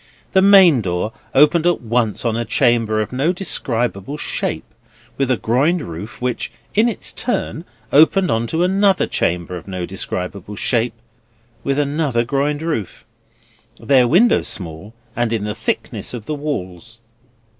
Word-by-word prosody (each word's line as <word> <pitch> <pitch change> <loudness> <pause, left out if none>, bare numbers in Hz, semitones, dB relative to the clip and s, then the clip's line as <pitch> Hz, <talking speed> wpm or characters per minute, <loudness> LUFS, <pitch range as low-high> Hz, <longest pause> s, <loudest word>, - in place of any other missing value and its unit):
The 190 - +5
main 190 - +7
door 90 +3 -2 0.2
opened 150 +4 +5
at 175 - +2
once 120 -1 -1
on 115 -2 +1
a 120 - -1
chamber 115 -4 +1
of 105 - -10
no 140 +7 +1
describable 125 - -2
shape, - - -3 0.5
with 135 -2 -1
a 130 - +2
groined 145 +11 +1
roof, 90 +7 -8
which 125 -1 -2 0.2
in 220 +3 +3
its 230 - -3
turn 180 -8 -2 0.3
opened 175 +6 +5
on 115 +1 0
another 190 +3 +2
chamber 90 +1 -2
of 85 - -12
no 90 -2 -4
describable 95 +1 -5
shape, 115 +2 0 0.7
with 135 0 0
another 145 -4 0
groined 145 +4 -1
roof: 130 - -4 0.7
their 130 -3 +4
windows 210 - +4
small, 90 +4 -4 0.2
and 120 -1 0
in 110 -3 -1
the 105 0 -2
thickness - - -3
of 110 -3 -8
the 155 - -3
walls. 115 - -5
125 Hz, 145 wpm, -19 LUFS, 110-155 Hz, 0.7 s, main